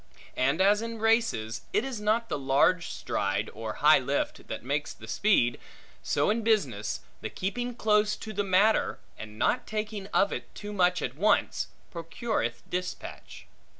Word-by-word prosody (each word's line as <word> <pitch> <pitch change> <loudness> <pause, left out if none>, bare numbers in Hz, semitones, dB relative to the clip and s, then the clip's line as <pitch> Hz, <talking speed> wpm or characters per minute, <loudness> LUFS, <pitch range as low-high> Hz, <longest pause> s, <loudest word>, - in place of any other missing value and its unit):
And 140 +7 +2
as 205 +2 +4
in 230 0 -4
races 225 - +1
it 215 - +2
is 250 -6 -4
not 220 +2 +1
the 150 - -2
large 140 +6 +3
stride 100 +1 -2
or 110 0 -5
high 155 0 +8
lift 135 +2 -2
that - - -5
makes 145 +3 -2
the 110 - -12
speed; 120 - +2 0.4
so - - +1
in 230 +2 0
business, 140 - 0 0.2
the - - -4
keeping 245 +6 -3
close 210 -1 +2
to 215 0 -8
the 205 0 0
matter, 200 +3 +3 0.2
and 105 0 -9
not - - +1
taking 215 -2 -4
of 200 0 +2
it - - -7
too 205 0 -7
much 180 -2 +2
at 125 - -2
once, 200 +10 +1 0.3
procureth 180 +7 -3
dispatch. 180 0 -6
195 Hz, 160 wpm, -28 LUFS, 135-215 Hz, 0.4 s, high